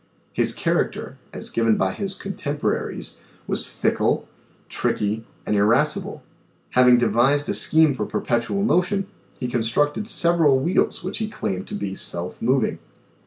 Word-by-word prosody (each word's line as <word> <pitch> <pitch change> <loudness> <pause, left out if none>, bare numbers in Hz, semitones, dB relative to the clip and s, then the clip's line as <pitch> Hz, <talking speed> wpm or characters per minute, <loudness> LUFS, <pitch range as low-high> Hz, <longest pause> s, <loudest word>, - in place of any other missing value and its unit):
His - - 0
character, - - -1
as - - -6
given 115 -1 +2
by 95 0 0
his 195 -1 -3
contemporaries 150 -7 -3 0.3
was - - -2
fickle, - - 0 0.4
tricky, 105 +2 -1 0.2
and 105 - 0
irascible. 105 +3 +1 0.5
Having 125 -1 +6
devised 130 +5 +2
a - - +1
scheme 160 -2 +5
for 130 - -3
perpetual 120 +12 -1
motion 195 -1 +1 0.3
he 125 - -2
con 120 -1 -1
structed 145 - 0
several 170 - +3
wheels 170 +7 0
which 185 - -4
he 220 - -1
claimed.to 95 - -4
be 100 -1 -4
self 90 -2 -2
moving. 125 +1 +1
130 Hz, 135 wpm, -23 LUFS, 115-170 Hz, 0.5 s, Having